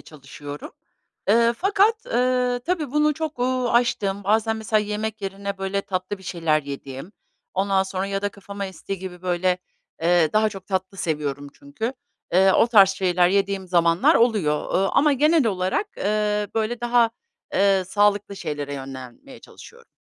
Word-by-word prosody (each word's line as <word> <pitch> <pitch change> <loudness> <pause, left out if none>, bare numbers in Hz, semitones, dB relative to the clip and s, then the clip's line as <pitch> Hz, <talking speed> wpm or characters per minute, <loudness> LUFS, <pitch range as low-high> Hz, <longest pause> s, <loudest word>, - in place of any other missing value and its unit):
çalışıyorum. 145 0 -10 0.6
Eee, 230 +2 +4
fakat, 415 +5 +2
eee, 250 - +1
tabii 320 -7 -1
bunu 300 0 +2
çok, 315 -4 -5
uuu, 255 -1 0
aştığım 205 -5 +1
bazen 220 +2 +2
mesela 215 0 +1
yemek 210 +1 -4
yerine, 195 0 -5
böyle, 195 +1 -1
tatlı 185 +1 -4
bir - - -16
şeyler 165 -4 0
yediğim, 140 +5 -8 0.4
ondan 195 0 +2
sonra 190 0 -3
ya 195 0 -3
da 205 - +1
kafama 200 0 -7
estiği 190 0 -6
gibi, 180 -1 -8
böyle, 180 0 0 0.4
eee, 170 -1 +4
-daha 215 0 +3
çok 195 -2 -10
tatlı 190 0 -3
seviyorum 145 -4 -3
çünkü 280 -4 -5 0.4
eee, 190 +1 +5
o - - +4
tarz 200 -5 +6
şeyler 180 -2 +2
yediğim 195 0 0
zamanlar 170 -1 +3
oluyor, 205 -11 +1
ııı, 195 +1 +2
ama 300 0 +3
genel 300 0 +3
olarak, 190 - 0
eee, 210 0 0
böyle 225 +2 -1
daha, 240 -1 +3 0.4
eee, 195 -1 +3
sağlıklı 205 +1 +1
şeylere 145 -4 -4
yönlenmeye 135 - -9
çalışıyorum. 470 0 -15
200 Hz, 155 wpm, -23 LUFS, 185-235 Hz, 0.6 s, tarz